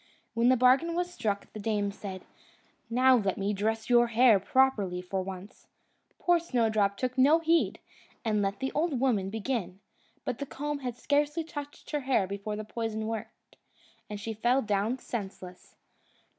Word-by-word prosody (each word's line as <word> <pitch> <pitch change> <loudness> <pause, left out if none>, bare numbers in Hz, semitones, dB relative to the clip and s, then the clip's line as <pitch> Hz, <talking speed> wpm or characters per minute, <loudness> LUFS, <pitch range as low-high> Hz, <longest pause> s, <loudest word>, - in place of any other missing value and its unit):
When 235 +1 +3
the 255 - +5
bargain 265 +8 +4
was 355 0 -2
struck, 210 - -3
the 215 - -7
dame 205 -1 -1
said, 195 -2 -8 0.7
"Now 255 +2 +5
let 195 -4 -1
me 200 +1 -1
dress 220 +2 -1
your 240 -1 +5
hair 235 -2 +5
properly 205 -5 +2
for 185 +1 -3
once." 190 +1 -9 0.5
Poor 350 -1 +3
Snowdrop 220 -9 +1
took 255 +3 -2
no 290 +5 +6
heed, 330 0 +2 0.5
and 215 -2 +1
let 195 0 -1
the 265 0 -2
old 300 -3 0
woman 220 -8 +1
begin; 205 -4 -3 0.5
but 230 - -3
the 280 - -4
comb 295 +2 -4
had 250 -3 -5
scarcely 295 +4 +1
touched 290 -2 -8
her 300 - 0
hair 260 -7 +1
before 200 +2 -4
the 215 - -5
poison 220 -1 -3
worked, 220 -1 -7 0.5
and 210 -1 -5
she 225 +2 -4
fell 240 +5 +2
down 210 +3 0
senseless. 190 -7 -7
225 Hz, 165 wpm, -29 LUFS, 200-265 Hz, 0.7 s, no